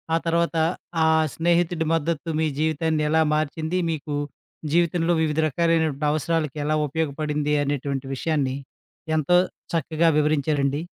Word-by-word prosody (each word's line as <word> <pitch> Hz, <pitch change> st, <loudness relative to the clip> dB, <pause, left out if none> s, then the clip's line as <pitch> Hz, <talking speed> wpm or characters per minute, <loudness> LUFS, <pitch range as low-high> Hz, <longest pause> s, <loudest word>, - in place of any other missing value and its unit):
ఆ -, -, +4 dB
తర్వాత 170 Hz, 0 st, +1 dB, 0.5 s
ఆ -, -, +4 dB, 0.3 s
స్నేహితుడి 170 Hz, 0 st, +1 dB
మద్దతు 165 Hz, 0 st, -1 dB
మీ 160 Hz, -, +2 dB
జీవితాన్ని 155 Hz, 0 st, 0 dB
ఎలా 160 Hz, +1 st, +3 dB
మార్చింది, 155 Hz, +3 st, -1 dB
మీకు 155 Hz, -2 st, -4 dB, 0.6 s
జీవితంలో 170 Hz, 0 st, +2 dB
వివిధ 155 Hz, -1 st, 0 dB
రకాలైనటువంటి 160 Hz, -1 st, +1 dB
అవసరాలకి 155 Hz, -1 st, -1 dB
ఎలా 155 Hz, +1 st, +1 dB
ఉపయోగపడింది 150 Hz, 0 st, -1 dB
అనేటువంటి 140 Hz, -1 st, -2 dB
విషయాన్ని 140 Hz, -2 st, -1 dB, 0.6 s
ఎంతో 155 Hz, +4 st, +3 dB, 0.4 s
చక్కగా 165 Hz, 0 st, +1 dB
వివరించారండి. 145 Hz, -1 st, +1 dB
155 Hz, 115 wpm, -24 LUFS, 145-165 Hz, 0.6 s, ఆ